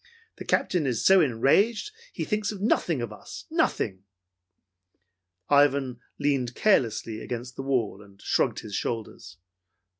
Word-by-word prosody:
The - - -8
Captain 170 -6 +1
is 120 -4 -1
so 190 -1 +7
enraged 165 - +2
that 445 - -27
he - - -4
thinks 210 -1 -1
nothing 185 - 0
of 110 -3 -5
us, - - -10
nothing!" 95 0 0 1.4
Ivan 140 -3 +3 0.2
leaned 135 -4 0
carelessly 115 - +1
against 125 +1 -6
the - - -5
wall 125 -7 -1
and 100 -1 -18
shrugged - - 0
his 105 - -9
shoulders. 110 -3 -4
130 Hz, 130 wpm, -26 LUFS, 115-165 Hz, 1.4 s, so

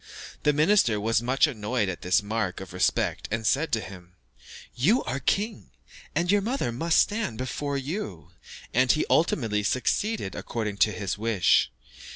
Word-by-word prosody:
The 150 - +3
minister 150 - +3
was 110 +1 +1
much 130 +5 +3
annoyed 115 -5 -2
at 90 -2 -4
this 90 +3 +2
mark 110 -3 -2
of 95 -2 -9
respect, 90 0 0
and 115 +1 -3
said 140 +8 +1
to 115 - +3
him, 90 -3 -11 0.6
"You 190 - +2
are 130 - -3
king, 205 - -1 0.5
and 175 +2 +1
your 205 0 +3
mother 230 - -1
must 160 +8 +1
stand 210 - 0
before 140 +3 -3
you." 130 - -5 0.4
And 130 +1 +4
he 155 - +1
ultimately 115 -10 +2
succeeded 130 - -1
according 110 -4 -4
to 105 - +4
his 100 -1 -4
wish. 110 -4 +3
120 Hz, 160 wpm, -26 LUFS, 105-155 Hz, 0.6 s, And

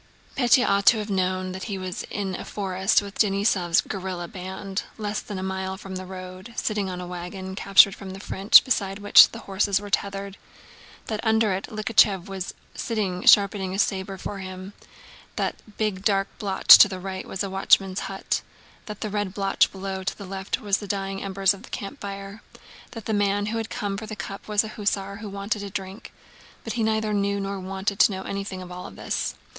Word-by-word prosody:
Pétya 245 -1 +4
ought 200 0 +1
to 235 - +8
have 210 -1 -4
known 185 -1 0
that 190 +1 -6
he 200 -4 -4
was 185 -1 -5
in 195 -2 -3
a - - -5
forest 190 0 +1
with 200 0 -10
Denísov's 195 -4 +3
guerrilla 185 -3 -5
band, 190 +2 -5 0.2
less 210 -1 -2
than 205 - -7
a 185 - -4
mile 190 0 -3
from 195 -1 -8
the 185 0 -6
road, 185 +3 -9
sitting 210 -3 -1
on 180 -1 -5
a 180 - -5
wagon 180 +2 -6
captured 195 0 +6
from 195 0 -9
the 190 +1 -8
French 195 0 +6
beside 195 -7 -1
which 205 0 +8
horses 195 0 -1
were 205 0 -9
tethered, 195 0 -2 0.7
that 215 -2 -3
under 220 -2 +2
it 190 - -4
Likhachëv 215 -4 +3
was 195 -2 -6 0.2
sitting 205 -5 -2
sharpening 195 -2 +5
a - - -3
saber 195 -1 -1
for 200 +2 -6
him, 185 +1 -8 0.6
that - - -1
the 215 - -19
big 205 -3 -1
dark 195 -2 +2
blotch 195 -2 +8
to - - +9
the 190 -2 -6
right 190 0 -6
was 190 - -5
the 200 - -1
watchman's 195 0 +3
hut, 195 0 -2 0.5
and 210 -2 -6
the 215 - -2
red 205 -2 -2
blotch 195 -1 +2
below 190 0 -5
to 195 - -3
the 200 - -8
left 195 +1 -3
was 205 -2 +1
the 205 - -8
dying 195 -1 -3
embers 195 0 +2
of 200 - -12
a - - -16
campfire, 200 -2 -7 0.5
that 225 -3 -9
the 220 - -1
man 205 0 +1
who 220 +2 -2
had 225 -1 -3
come 200 -1 -3
for 220 +1 -7
the 215 - -6
cup 200 -1 -7
was 210 0 +2
an 215 - -7
hussar 200 -2 -2
who 210 0 -7
wanted 200 +2 -3
a 200 - -5
drink; 195 +2 -7 0.5
but 225 - -4
he 235 - -2
neither 220 -1 +1
knew 200 0 0
nor 195 0 -3
waited 195 +2 -3
to - - +6
know 190 -1 -5
anything 195 -2 -5
of 180 - -11
all 180 0 -7
this. - - -3
195 Hz, 205 wpm, -25 LUFS, 190-205 Hz, 0.7 s, to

